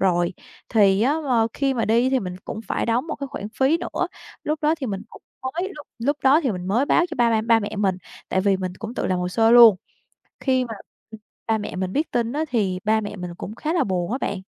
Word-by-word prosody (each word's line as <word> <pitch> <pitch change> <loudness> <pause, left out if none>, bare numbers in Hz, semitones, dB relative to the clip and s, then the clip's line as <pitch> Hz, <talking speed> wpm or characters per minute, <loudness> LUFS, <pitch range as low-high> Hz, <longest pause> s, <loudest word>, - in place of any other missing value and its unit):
rồi, 175 -2 +2 0.4
thì 200 -2 +4
á, 275 +5 +3
ờ, 230 -2 +3
khi 275 -1 0
mà 230 - 0
đi 235 +4 +3
thì 265 - +2
mình 180 -2 -5
cũng 220 - -5
phải - - -1
đóng 240 +6 +1
một 315 - -4
cái 280 - -5
khoản 210 -5 -6
phí 280 +5 +3
nữa. - - -2 0.4
Lúc 305 +1 -1
đó 305 +2 +3
thì 280 -5 -5
mình 200 -1 -4
cũng - - -15 0.2
mới, 335 +9 -2
lúc 295 - -10
lúc 280 +5 0
đó 285 +5 +6
thì 260 -8 0
mình 180 0 -5
mới 245 +8 +2
báo 345 - +4
cho - - -4
ba 235 -1 +3
ba 220 -1 +2
ba 230 0 +4
mẹ 205 - -5
mình, 195 -3 +1 0.3
tại 185 - +1
vì 195 -1 +2
mình 185 -1 -4
cũng 225 +2 -6
tự - - -2
làm 185 -1 0
hồ 180 0 -1
sơ 225 +4 +3
luôn. 235 -4 +9 0.6
Khi 260 -2 +1
mà, 225 - -6 0.4
ừm, 220 - -10 0.3
ba 225 - +2
mẹ 210 - -6
mình 185 0 -3
biết 305 +3 -1
tin 235 0 0
á 310 +2 -1
thì 195 -7 0
ba 220 +1 +2
mẹ 205 0 -6
mình 180 -2 -7
cũng 215 - -7
khá 315 +6 -2
là 335 - +2
buồn 185 -2 -2
á 255 - 0
bạn. 200 - -1
225 Hz, 265 wpm, -23 LUFS, 195-265 Hz, 0.6 s, luôn